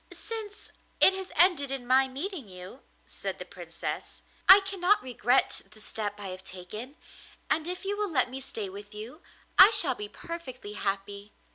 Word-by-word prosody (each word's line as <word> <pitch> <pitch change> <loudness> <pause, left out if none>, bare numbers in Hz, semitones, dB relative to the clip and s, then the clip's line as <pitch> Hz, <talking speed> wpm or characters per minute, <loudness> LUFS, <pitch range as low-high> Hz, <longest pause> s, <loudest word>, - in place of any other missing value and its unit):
'Since 435 -2 -7 0.3
it 380 - +7
has 380 0 -6
ended 335 -4 +4
in 270 -2 -4
my 260 +2 +4
meeting 280 - -5
you,' 185 +8 -10 0.2
said - - -6
the - - -8
Princess, - - -7 0.3
'I 390 +2 +12
cannot 390 -1 +1
regret 250 0 +1
the 215 +1 -16
step 210 -1 -4
I 200 -2 -6
have 185 0 -8
taken, 210 - -9 0.5
and 315 +1 +1
if 360 +2 -5
you 400 +1 -1
will 415 -1 -1
let 260 -7 +2
me 260 +2 -7
stay 220 -5 -5
with 205 +2 -10
you, 235 +10 -9 0.4
I 375 - +12
shall 375 - +4
be 210 -3 -7
perfectly 255 -7 -8
happy. 200 0 -4
260 Hz, 170 wpm, -28 LUFS, -, 0.5 s, I